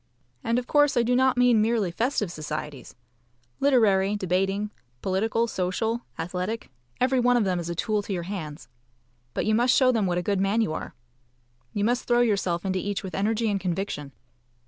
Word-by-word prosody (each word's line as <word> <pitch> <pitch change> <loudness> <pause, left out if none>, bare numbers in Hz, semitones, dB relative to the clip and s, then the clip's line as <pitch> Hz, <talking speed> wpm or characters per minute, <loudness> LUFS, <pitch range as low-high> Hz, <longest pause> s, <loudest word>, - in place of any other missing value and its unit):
And 230 0 +1
of 250 - -1
course 290 -1 +3
I 240 - +4
do 245 +1 +2
not 260 0 +3
mean 245 -3 +5
merely 220 -4 +1
festive 220 -1 -1
societies. 150 -4 -6 0.6
Literary, 210 -8 +3
debating, 195 +2 0 0.3
political, 220 +4 +1
social, 220 +3 -1 0.2
athletic, 180 - -4 0.3
every 255 +1 +2
one 245 0 +4
of 235 - +2
them 185 -3 0
is 170 0 -5
a 170 - -3
tool 210 +4 0
to 205 - -8
your 175 -2 -2
hands. 165 -6 -6 0.7
But - - -1
you 215 - +2
must 240 +3 +4
show 255 -1 +5
them 220 -5 +1
what 175 -1 0
a 175 - -1
good 200 0 0
man 195 +3 +1
you 185 -8 0
are. - - -6 0.8
You 205 - -2
must 245 +2 0
throw 240 0 +4
yourself 195 -6 0
into 190 -1 0
each 205 +2 -3
with 190 - -6
energy 220 +3 0
and 200 -2 0
conviction. 175 -5 -3
205 Hz, 190 wpm, -26 LUFS, 185-235 Hz, 0.8 s, mean